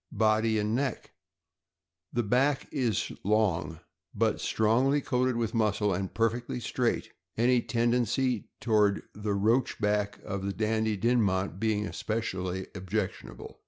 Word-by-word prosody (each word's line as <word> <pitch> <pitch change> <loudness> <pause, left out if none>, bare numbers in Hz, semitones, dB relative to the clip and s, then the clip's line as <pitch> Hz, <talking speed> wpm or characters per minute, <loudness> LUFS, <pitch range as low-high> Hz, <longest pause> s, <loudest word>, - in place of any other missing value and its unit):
Body 110 +1 +3
and 105 +1 0
neck. 130 0 -2 0.5
— - - -61
The 120 - +1
back 130 +6 +1
is 125 -8 0
long, 95 -6 +1 0.3
but - - +1
strongly 125 +6 +2
coated 125 -2 0
with 115 -2 -1
muscle 105 -3 +1
and 95 +1 -3
perfectly 115 +2 -1
straight, 120 +1 -1 0.3
any 120 +1 +4
tendency 120 0 0
toward 105 -3 +2
the 105 0 -2
roach 115 +6 +1
back 105 0 0
of 100 -1 -4
the 100 0 -2
Dandie 110 0 0
Dinmont 100 -5 +1
being 110 -1 0
especially 95 -5 -3
objectionable. 95 +1 -5
110 Hz, 125 wpm, -29 LUFS, 100-120 Hz, 0.5 s, any